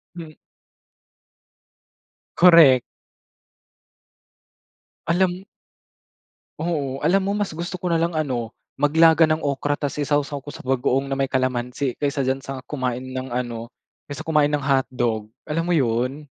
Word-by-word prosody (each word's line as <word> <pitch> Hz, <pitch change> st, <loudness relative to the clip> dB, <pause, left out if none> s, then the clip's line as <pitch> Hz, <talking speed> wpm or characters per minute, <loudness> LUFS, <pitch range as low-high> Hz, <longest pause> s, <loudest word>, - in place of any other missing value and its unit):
Mm. 160 Hz, -3 st, -9 dB, 2.0 s
Korek. 165 Hz, -8 st, +7 dB, 2.3 s
Alam 180 Hz, +2 st, +1 dB, 1.2 s
Oo, 145 Hz, -5 st, -3 dB
alam 180 Hz, +6 st, +4 dB
mo 195 Hz, +1 st, -1 dB
mas 205 Hz, -1 st, -2 dB
gusto 170 Hz, +3 st, -5 dB
ko 180 Hz, -1 st, -3 dB
nalang 170 Hz, 0 st, 0 dB
ano, 125 Hz, -8 st, -2 dB, 0.2 s
maglaga 160 Hz, +2 st, +5 dB
ng 155 Hz, 0 st, -1 dB
okra 145 Hz, +1 st, -1 dB
tas 145 Hz, 0 st, -4 dB
isawsaw 145 Hz, 0 st, 0 dB
ko 140 Hz, +2 st, -11 dB
sa -, -, -10 dB
bagoong 135 Hz, +1 st, 0 dB
na -, -, 0 dB
may 135 Hz, -, +1 dB
kalamansi, 130 Hz, 0 st, -2 dB
kaysa 140 Hz, -1 st, -1 dB
diyan 130 Hz, +1 st, 0 dB
sa 135 Hz, -1 st, -7 dB
kumain 130 Hz, -3 st, -3 dB
ng 130 Hz, 0 st, -6 dB
ano, 120 Hz, -2 st, -4 dB, 0.4 s
kaysa 145 Hz, -2 st, -7 dB
kumain 150 Hz, -2 st, +3 dB
ng 145 Hz, -1 st, -2 dB
hotdog. 125 Hz, -5 st, 0 dB, 0.2 s
Alam 165 Hz, +2 st, -2 dB
mo 175 Hz, -, +1 dB
'yon 130 Hz, +2 st, 0 dB
145 Hz, 130 wpm, -22 LUFS, 130-160 Hz, 2.3 s, Korek